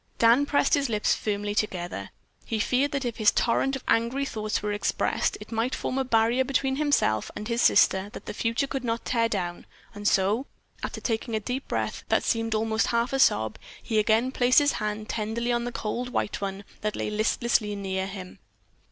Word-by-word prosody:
Dan 235 +5 +5
pressed 285 - +2
his 280 -4 +2
lips 210 -2 +2
firmly 205 -1 -2
together. 175 - -2 0.3
He 225 - -3
feared 260 +6 +1
that 275 -2 -1
if 235 -2 -3
his 215 -2 +5
torrent 270 +5 +1
of 270 - -7
angry 240 +5 +1
thoughts 215 -5 -3
were 210 0 -1
expressed 205 - 0
it - - -11
might 230 +3 0
form 265 - -2
a - - +2
barrier 235 +1 +3
between 265 0 0
himself 285 - +1
and 210 - -5
his 235 0 0
sister 190 +1 +4
that - - -9
the - - -5
future 230 +5 0
could 270 -1 -4
not 230 -1 -2
tear 230 -2 +1
down, 175 -5 -3 0.3
and 205 -1 -3
so, 205 +8 +2 0.3
after - - -4
taking 225 0 -2
a - - +1
deep 250 +5 -4
breath - - -2
that - - +3
seemed 225 -2 0
almost 220 0 +1
a - - -2
half 235 +2 0
sob, 110 - +2 0.2
he 220 -3 +1
again 225 +4 +2
placed 250 -1 +3
his 290 -1 +6
hand 215 0 -3
tenderly 230 +2 -2
on 240 0 0
the 245 - -3
cold 240 +3 -3
white 205 - -2
one 195 0 -4 0.2
that 215 0 -2
lay - - -3
listlessly 215 0 +1
near 190 -1 -2
him. 190 -2 -9
225 Hz, 200 wpm, -26 LUFS, 210-250 Hz, 0.3 s, his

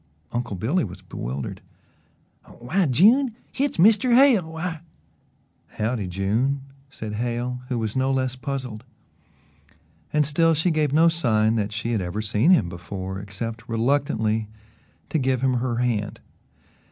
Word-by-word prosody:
Uncle 120 -4 -3
Billy 135 - 0
was 95 +1 -8
bewildered. 70 -6 -5 1.0
"Why, 165 +9 0
June, 225 - +4 0.2
hit's 280 0 -1
Mr. 225 +7 +5
Hale 240 - +5
why 165 -1 -4 0.4
" - - -30
"Howdye, 110 -2 -1
June!" 110 +10 0 0.3
said 110 -5 -7
Hale, 120 +2 -2
who 125 -2 -2
was 110 -2 -3
no 130 0 +1
less 130 -1 0
puzzled 130 -4 -5 1.3
and 150 0 +2
still 165 +3 +3
she 160 +4 +1
gave 155 -3 +1
no 160 +3 +5
sign 115 -10 +2
that 105 -1 -1
she 115 +2 -3
had 110 -4 0
ever 90 +3 -4
seen 105 - +2
him 125 - +5
before 95 +2 -6
except 115 +4 -6
reluctantly 115 -3 0 0.6
to 160 - 0
give 130 -2 0
him 130 -2 +2
her 125 -2 -1
hand. 115 -4 -1
125 Hz, 140 wpm, -24 LUFS, 110-155 Hz, 1.3 s, Mr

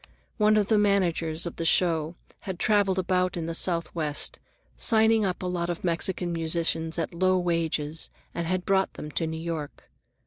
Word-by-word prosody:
One 215 -1 +4
of 210 - +3
the 215 +1 +3
managers 175 -5 +1
of 170 - -6
the - - -2
show 165 -1 +2 0.2
had 190 -3 -6
traveled 200 -1 +2
about 185 0 +1
the 165 -1 -3
Southwest, 165 -3 -1 0.4
signing 220 -1 +4
up 185 -1 -2
a - - -2
lot 175 -1 -2
of 175 - -4
Mexican 175 0 -1
musicians 165 0 0
at 165 0 -2
low 185 +2 +2
wages, 165 -3 -1 0.2
and 170 -1 -3
had 185 +1 -1
brought 195 -1 +2
them 150 - -7
to 165 - -1
New 160 0 -4
York. 160 -3 -6
170 Hz, 170 wpm, -27 LUFS, 165-190 Hz, 0.4 s, One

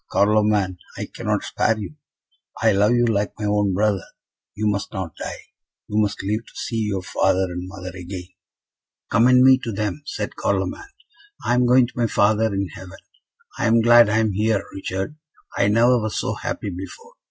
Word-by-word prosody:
Carloman! 105 -2 +2 0.2
I - - -3
cannot - - -2
spare 115 - 0
you. 110 +6 -6 0.7
I 115 - +4
love 105 +3 +3
you 120 0 +3
like 105 -3 0
my 105 - -4
own 105 -2 +1
brother. 100 -2 +1 0.5
You 105 +2 -2
must 100 -1 -1
not 95 -6 -5
die - - -7 0.4
you 105 +1 +1
must 105 -2 -2
live 105 +3 -1
to - - -18
see 115 - -4
your 100 -3 -2
father 95 +1 +1
and 90 +1 -5
mother 90 0 -8
again!" 90 0 -7 0.8
"Commend 125 +2 +5
me 130 0 +7
to 115 - -5
them," 105 +7 -3
said - - -4
Carloman. 400 0 -2 0.6
"I - - +2
am 125 0 +3
going 125 0 +5
to 120 - -11
my 120 -1 +1
Father 110 +1 +2
in 100 -1 -2
heaven. 90 +3 -11 0.6
I - - +1
am 115 +1 +4
glad 120 -1 +7
I 110 - +2
am 110 -1 +2
here, 105 +1 0
Richard; 95 +8 -4 0.4
I 100 - +2
never 115 +3 +4
was 110 0 -3
so - - -1
happy 100 - -4
before. 95 - -9
105 Hz, 185 wpm, -22 LUFS, 95-115 Hz, 0.8 s, me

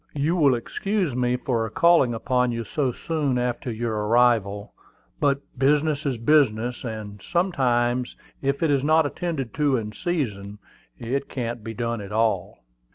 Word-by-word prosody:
"You 150 +4 +1
will 145 -7 +4
excuse 185 - -2
me 125 0 +1
for 115 -3 -1
calling 160 -3 +4
upon 125 +1 +1
you 115 0 -3
so 130 +4 -1
soon 145 -1 -1
after 125 0 -2
your 115 0 -2
arrival; 110 -4 +2 0.5
but 140 -1 +2
business 150 +2 +1
is 130 -3 -1
business, 120 -3 +2
and 110 -4 -6
sometimes 125 -9 0 0.3
if 140 +2 -1
it 160 - +3
is 140 -2 +2
not 155 +1 +4
attended 145 - -3
to 145 -3 +2
in 105 -2 -4
season, 105 - -3 0.4
it 135 +4 -3
can't 120 -3 -4
be 115 +1 -6
done 115 -1 -2
at 100 0 -9
all." 110 -4 0
125 Hz, 155 wpm, -24 LUFS, 115-145 Hz, 0.5 s, will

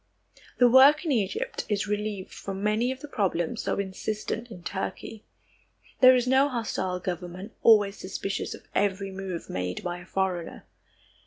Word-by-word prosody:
The 245 - +6
work 275 +6 +7
in 315 - 0
Egypt 200 -7 -1
is 205 -2 0
relieved 210 -2 -3
from 195 0 -6
many 215 +4 +1
of 260 0 -7
the 295 - -7
problems 185 - -1
so - - -1
insistent 215 +4 -3
in 180 -6 -11
Turkey. 200 +3 -5 0.7
There 255 0 +8
is 250 -1 +1
no 265 +2 +4
hostile 205 -7 -2
government, 180 +3 -5
always 205 -3 +5
suspicious 195 +1 -4
of - - -15
every 195 -1 0
move 190 -3 -5
made 90 0 -4
by 175 0 -3
a 175 - -12
foreigner. 185 -3 -2
200 Hz, 155 wpm, -27 LUFS, 185-235 Hz, 0.7 s, There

